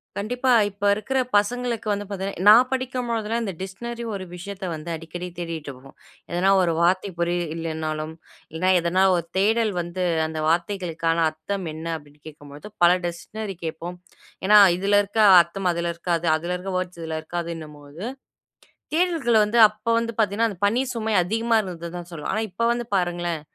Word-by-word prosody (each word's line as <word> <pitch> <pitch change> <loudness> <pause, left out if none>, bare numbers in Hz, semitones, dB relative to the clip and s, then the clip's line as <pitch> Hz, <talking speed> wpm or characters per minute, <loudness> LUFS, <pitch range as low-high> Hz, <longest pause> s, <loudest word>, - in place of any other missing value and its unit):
கண்டிப்பா, 245 +5 -1 0.2
இப்ப 200 +1 -14
இருக்கிற 265 +6 -2 0.2
பசங்களுக்கு 230 +1 0
வந்து 205 0 -2
பாத்தீங்கன்னா 195 -2 -4
நான் 245 +4 +7
படிக்கும்பொழுதெல்லாம் 235 -3 -2
இந்த 195 -4 -3
டிக்ஷ்னரி 235 +5 -6
ஒரு 190 -1 -4
விஷயத்தை 190 +1 -6
வந்து 160 +2 -7
அடிக்கடி 175 +2 -7
தேடிட்ருப்போம். 145 -6 -7 0.3
எதனா 180 +3 +2
ஒரு 175 -2 +2
வார்த்தை 185 +3 +2
புரியில்லைனாலும், 160 -2 -2 0.4
இல்லனா 175 +4 0
எதனா 175 +3 +2
ஒரு 170 - -2
தேடல் 220 +2 +2
வந்து, 175 +2 -4 0.2
அந்த 160 0 -5
வார்த்தைகளுக்கான 165 -1 0
அர்த்தம் 185 +4 -5
என்ன 160 +1 -8
அப்டின்னு 145 -1 -19
கேக்கும்பொழுது 145 +5 -11
பல 175 - +8
டிக்ஷ்னரி 195 +4 -5
கேப்போம். 165 +2 -5 0.5
ஏன்னா 210 +1 +7 0.2
இதில 200 +2 +3
இருக்க 205 +2 -4 0.2
அர்த்தம் 180 +2 -2
அதில 170 0 -2
இருக்காது, 170 0 -2
அதில 170 +3 -3
இருக்கிற 185 +1 -5
வோர்ட்ஸ் 180 -2 -4
இதில 160 -1 -3
இருக்காதுன்னும்போது 160 -2 -7 0.9
தேடல்கள் 315 -11 +3
வந்து 220 +3 0
அப்போ 215 +2 -5
வந்து 230 0 -2
பாத்தீங்கன்னா 220 +2 +2
அந்த 200 - -8
பணி 230 +5 +2
சுமை 220 -1 -2
அதிகமா 225 +4 0
இருந்தது 170 -4 -6
தான் 175 - -9
சொல்வேன். 160 -3 -5
ஆனா 215 - 0
இப்ப 190 +6 -5
வந்து 240 0 -2
பாருங்களேன், 175 -3 -1
185 Hz, 155 wpm, -24 LUFS, 165-215 Hz, 0.9 s, பல